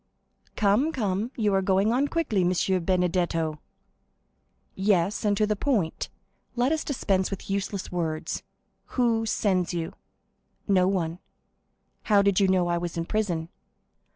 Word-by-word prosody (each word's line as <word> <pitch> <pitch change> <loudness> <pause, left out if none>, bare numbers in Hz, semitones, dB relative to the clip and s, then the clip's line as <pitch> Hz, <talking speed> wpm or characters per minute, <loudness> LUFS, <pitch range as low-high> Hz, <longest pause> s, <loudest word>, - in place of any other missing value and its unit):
"Come, 215 +9 +3
come, 210 -5 -1
you 210 -3 +1
are 195 - +3
going 195 +3 +2
on 270 +4 +2
quickly, 285 - 0
M. 180 0 +1
Benedetto!" 175 -3 0 1.1
"Yes, 195 +1 +1
and 205 -1 +2
to 215 - +3
the 210 0 0
point. 205 - -1 0.5
Let 245 +3 +2
us 315 -1 0
dispense 195 -9 0
with 195 0 -6
useless 200 0 -3
words. 160 -3 -2 0.6
Who 230 -2 +2
sends 185 -5 +1
you?" 165 -1 -3 0.7
"No 185 -3 +4
one." 175 -3 -1 0.9
"How 205 -2 +4
did 200 -1 +3
you 195 - +4
know 185 -2 +2
I 170 0 0
was 175 -1 -4
in 165 - -1
prison?" 175 -6 -1
195 Hz, 140 wpm, -26 LUFS, 175-215 Hz, 1.1 s, No